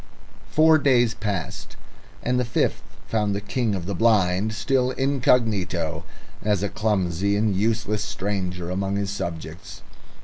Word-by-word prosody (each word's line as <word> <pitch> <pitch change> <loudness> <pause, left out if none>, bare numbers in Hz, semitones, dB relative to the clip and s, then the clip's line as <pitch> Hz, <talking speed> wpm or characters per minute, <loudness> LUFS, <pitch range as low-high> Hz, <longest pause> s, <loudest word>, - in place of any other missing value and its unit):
Four 155 0 +5
days 120 -5 +3
passed, 100 -7 -4 0.5
and 125 +1 +1
the - - +2
fifth 120 - 0 0.2
found 105 -2 0
the - - -1
King 105 +1 -1
of 90 -3 -4
the 100 - -3
Blind 100 0 +2
still 125 +3 +1
incognito, 120 - +1 0.4
as 105 -1 +1
a 100 - 0
clumsy 100 -2 0
and 105 -1 +1
useless 105 +1 0
stranger 90 -4 -3
among 95 +1 -1
his 100 -1 -1
subjects. 85 0 -6
105 Hz, 135 wpm, -24 LUFS, 95-115 Hz, 0.5 s, Four